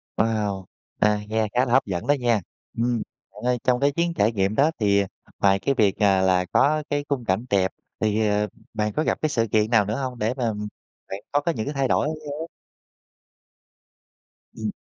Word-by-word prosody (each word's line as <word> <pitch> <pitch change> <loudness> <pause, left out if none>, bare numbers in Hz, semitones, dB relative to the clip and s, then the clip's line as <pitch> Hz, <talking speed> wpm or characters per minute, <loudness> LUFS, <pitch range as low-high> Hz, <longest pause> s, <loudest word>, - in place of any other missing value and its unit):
Wow! 105 -4 0 0.3
À, 105 0 +3
nghe 110 0 0
khá 125 +1 +3
là 120 - -4
hấp 130 - +4
dẫn 90 -4 -4
đó 145 - +5
nha, 120 -4 +2 0.4
ừm, 120 0 +1 0.3
bạn 105 - -12
ơi, 125 0 +2
trong 125 -1 +2
cái 140 +2 +3
chuyến 170 +3 0
trải 110 -8 +2
nghiệm 100 -1 0
đó 145 +6 +4
thì, 100 -2 +3
à, 100 - -3 0.3
ngoài 95 -1 +4
cái 140 +6 0
việc, 105 -6 +2
à, 95 -2 +4
là 90 -1 +3
có 150 +10 +2
cái 145 0 -1
khung 135 -4 -1
cảnh 95 +4 0
đẹp 95 -2 +2 0.3
thì, 110 0 +1
ờ, 105 0 +1 0.3
bạn 105 -1 -1
có 155 - 0
gặp - - -1
cái 155 - +1
sự 115 -6 +1
kiện 110 0 +2
nào 110 -4 +5
nữa 105 +3 -2
hông 130 -2 -4
để 110 +3 0
mà, 125 -3 0
ừm, 105 -1 -3 0.4
bạn 95 - -4
có 145 - +2
có 170 - 0
những 110 -6 -4
thay 135 -2 +1
đổi 145 - +2
đáng 155 - -2
nhớ? 150 +2 -6 2.1
Ừm. - - -3
110 Hz, 215 wpm, -24 LUFS, 105-135 Hz, 2.1 s, đó